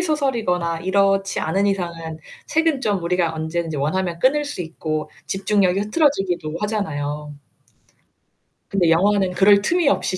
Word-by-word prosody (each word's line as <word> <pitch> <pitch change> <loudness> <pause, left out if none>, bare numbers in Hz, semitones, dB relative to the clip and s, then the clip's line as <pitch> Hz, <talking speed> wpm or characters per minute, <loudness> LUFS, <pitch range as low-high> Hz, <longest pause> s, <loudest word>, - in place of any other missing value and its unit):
소설이거나 220 - 0
이렇지 195 +1 +1
않은 195 +6 0
이상은 170 -4 -3 0.3
책은 320 -3 +1
좀 205 -7 0
우리가 170 -1 0
언제든지 160 0 -3
원하면 170 +5 -1
끊을 295 +8 +2
수 285 -10 -4
있고 155 -2 -4 0.2
집중력이 195 -1 +1
흐트러지기도 195 - 0
하잖아요. 150 -8 -3 1.4
근데 185 -4 +2
영화는 190 +3 +3
그럴 200 +2 +5
틈이 345 - +1
없이 185 -8 0
190 Hz, 330 characters per minute, -21 LUFS, 165-205 Hz, 1.4 s, 그럴